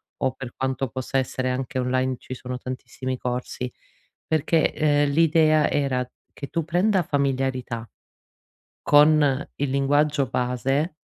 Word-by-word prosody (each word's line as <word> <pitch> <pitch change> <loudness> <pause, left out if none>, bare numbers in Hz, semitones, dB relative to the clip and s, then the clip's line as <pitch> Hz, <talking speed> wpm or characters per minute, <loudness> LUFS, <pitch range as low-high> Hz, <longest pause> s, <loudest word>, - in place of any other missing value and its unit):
o 130 - 0
per 130 -2 -9
quanto 130 0 -1
possa 130 +2 -3
essere, 130 0 -1
anche 130 +2 -3
online 130 +1 0
ci - - -8
sono 125 0 -6
tantissimi 130 +1 -5
corsi, 125 0 -4 0.6
perché, 160 +1 +2
ehm, 145 -1 +2
l'idea 155 -1 +4
era 130 -3 0 0.2
che 140 - -8
tu 165 +2 -2
prenda 180 +4 +2
familiarità 130 -5 -1 1.0
con 145 -2 +5
il 145 0 -1
linguaggio 145 +1 +2
base, 135 +7 -1
135 Hz, 125 wpm, -24 LUFS, 130-150 Hz, 1.0 s, con